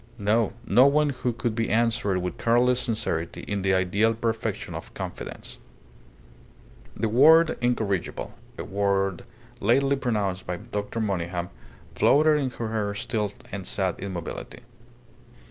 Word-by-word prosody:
No; 105 +1 +1
no 125 +7 +6
one 150 +1 +3
who 125 -2 -2
could 115 0 -2
be 115 0 -1
answered 110 -3 +1
with 90 -1 -4
careless 120 +2 +3
sincerity 110 -9 -2
in 100 -1 -3
the 95 0 +2
ideal 100 +5 +2
perfection 115 0 -2
of - - -7
confidence. - - -7 1.4
The 115 - 0
word 160 +8 +6
"incorrigible" 110 -7 -1 0.2
a - - -4
word 100 -2 0 0.3
lately 135 +6 +3
pronounced 105 -8 -2
by 90 0 -2
Dr. 105 +1 -4
Monygham 90 -4 -2 0.4
floated 150 +1 +4
into 130 -4 -3
her 110 -2 -2
still 105 -1 -2 0.2
and 95 -2 -5
sad 95 -3 -1
immobility. 95 -4 -6
110 Hz, 130 wpm, -26 LUFS, 95-120 Hz, 1.4 s, no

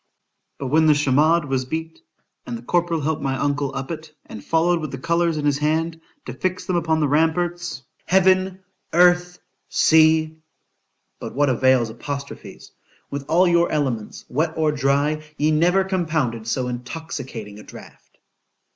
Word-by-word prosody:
——But 135 - -4
when 160 +3 +4
the 150 - +6
chamade 150 +3 +3
was 135 -2 -1
beat, 160 +4 -5 0.5
and 120 - -4
the 115 - -12
corporal 170 +3 0
helped 155 +1 -1
my 135 -1 -1
uncle 140 0 -1
up 135 +3 -4
it, 160 -1 -7
and 105 - -10
followed 170 +1 +2
with 155 - -4
the 135 - -6
colours 170 +3 0
in 150 - -2
his 145 -1 +1
hand, 160 +2 -1 0.2
to - - -6
fix 185 0 -3
them 185 - -1
upon 160 -2 +1
the 150 - +2
ramparts—Heaven! 175 +4 0 0.3
Earth! 180 +1 +4 0.3
Sea!——but 160 0 0
what 145 0 +2
avails 130 -2 +2
apostrophes?——with 140 +2 -9
all 180 +3 +4
your 170 0 +3
elements, 130 -8 -2
wet 155 +5 -1
or 155 -1 +2
dry, 145 +2 +1 0.2
ye 150 +1 +2
never 175 +5 +3
compounded 155 - -2
so 125 +2 -1
intoxicating 125 -4 -7
a - - -11
draught. - - -15
155 Hz, 145 wpm, -22 LUFS, 135-170 Hz, 0.5 s, the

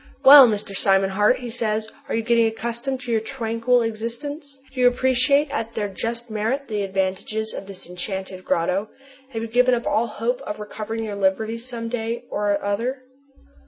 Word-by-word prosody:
"Well, 275 -1 +11
Mr. 205 -2 -3
Simon 195 0 +3
Hart," 210 +5 +3
he 245 -2 -7
says, 220 -2 -1 0.2
"are - - 0
you 225 - 0
getting 230 0 +3
accustomed 235 +4 -3
to 245 - -5
your 225 -1 +2
tranquil 230 0 0
existence? 255 +6 -5 0.2
Do 260 - -7
you 250 - +7
appreciate 260 +3 +3
at 230 0 -3
their 210 -2 -1
just 230 +5 -4
merit 225 +6 -2
the 210 -2 -2
advantages 195 +3 -2
of 195 - -7
this 195 -2 -10
enchanted 185 +1 -5
grotto? 185 +6 0 0.4
Have 225 -3 -4
you - - -3
given 250 +2 +3
up 235 - -4
all 230 +2 +1
hope 235 +4 -2
of 210 -6 -6
recovering 215 +2 -5
your 215 -2 -4
liberty 200 +4 0
some 235 -1 -6
day 230 0 -3
or 205 -1 0
other?" 240 +6 -2
225 Hz, 180 wpm, -23 LUFS, 210-245 Hz, 0.4 s, Well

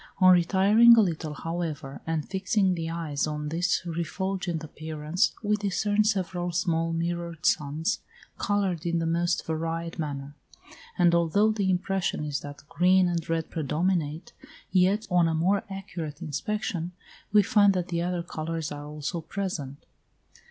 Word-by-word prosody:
On 185 -1 +7
retiring 200 +7 +6
a - - +8
little, 160 -5 -2
however, 160 -5 -4
and 160 -2 -1
fixing 190 0 +1
the 165 -2 -3
eyes 160 -4 -2
on 150 0 -3
this 170 +3 0
refulgent 175 +1 -3
appearance, 155 +3 -1
we 210 0 +2
discern 205 +1 +1
several 180 -4 -1
small 165 -1 0
mirrored 170 0 -3
suns, 150 +3 +1 0.4
coloured 195 -5 0
in 170 0 0
the 165 - -1
most 170 +1 0
varied 165 +1 -3
manner; 145 -2 -4 0.6
and 175 -1 +4
although 170 +6 +3
the 205 -3 0
impression 185 -3 0
is 145 -1 -2
that 145 0 -10
green 185 +3 +4
and 170 -2 -2
red 165 -1 -1
predominate, 160 +1 -1 0.4
yet, 190 +4 +3
on 175 -2 +4
a 160 - 0
more 190 +5 +2
accurate 170 -6 -6
inspection, 180 - -3 0.4
we 210 0 +6
find 205 -1 +4
that 180 -1 -2
the 170 -1 -1
other 175 0 -1
colours 160 -1 -4
are 145 0 -6
also 150 +3 -4
present. 160 -6 -5
170 Hz, 145 wpm, -27 LUFS, 160-190 Hz, 0.6 s, a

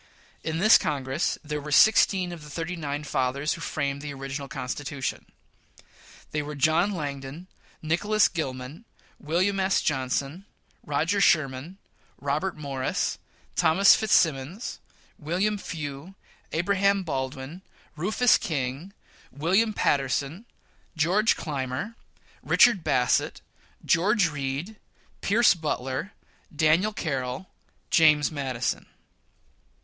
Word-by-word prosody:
In 160 0 -2
this 215 +6 +7
Congress 140 +1 -1
there 150 -1 -4
were 150 +1 -7
sixteen 190 +1 +5
of 170 -2 -8
the 150 - -11
thirty 165 +4 -4
nine 145 -2 -4
fathers 140 +1 -1
who 170 - -8
framed 140 -3 -2
the 145 -1 -6
original 135 +1 -5
Constitution. 135 +1 -4 1.0
They 150 - -1
were 150 0 -6
John 160 +7 +3
Langdon, 145 -2 -5 0.4
Nicholas 205 +7 +2
Gilman, 140 - -5 0.3
Wm. 185 +6 0
S. 190 0 +2
Johnnson, 140 +5 -2 0.4
Roger 160 +8 0
Sherman, 150 +2 +1 0.4
Robert 150 +6 -2
Morris, 135 -3 -2 0.4
Thos. 195 +5 +6
Fitzsimmons, 165 - +1 0.4
William 185 +7 -1
Few, 155 +1 -7 0.4
Abraham 195 +3 +1
Baldwin, 135 +2 -4 0.3
Rufus 215 +8 +3
King, 145 +4 -3 0.4
William 185 - +2
Paterson, 140 - 0 0.5
George 190 +8 +3
Claimer, 135 - -4 0.5
Richard 205 -8 +4
Bassett, 125 -1 +1 0.4
George 190 +1 +3
Read, 145 +8 -4 0.4
Pierce 225 +4 +4
Butler, 150 0 -3 0.4
Daniel 160 +7 +3
Carroll, 140 -3 -4 0.4
James 150 -2 +5
Madison. 135 -5 -3
155 Hz, 105 wpm, -26 LUFS, 140-185 Hz, 1.0 s, this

